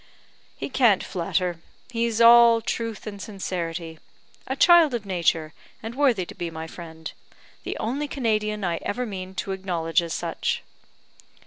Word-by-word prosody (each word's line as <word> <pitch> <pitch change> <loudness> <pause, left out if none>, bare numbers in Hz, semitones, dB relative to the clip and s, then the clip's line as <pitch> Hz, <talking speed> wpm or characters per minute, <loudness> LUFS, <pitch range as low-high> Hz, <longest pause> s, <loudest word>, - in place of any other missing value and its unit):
"He - - -4
can't 240 -8 +3
flatter. 175 -1 -2 0.3
He's 230 -1 0
all 235 0 +8
truth 225 0 -4
and 200 -2 -7
sincerity. 170 -5 -5 0.5
A 265 - -2
child 330 -3 +6
of 220 -3 -4
nature, 170 -4 0 0.3
and 225 +1 -5
worthy 250 -9 +2
to - - -10
be 175 - -4
my 160 0 -6
friend; 160 -1 -9 0.5
the - - -5
only 270 +7 -2
Canadian 215 -6 -1
I 175 -2 0
ever 250 +5 -3
mean 190 -3 -7
to 195 - -3
acknowledge 175 -3 0
as 170 -1 -4
such." - - -2
200 Hz, 145 wpm, -25 LUFS, 170-235 Hz, 0.5 s, all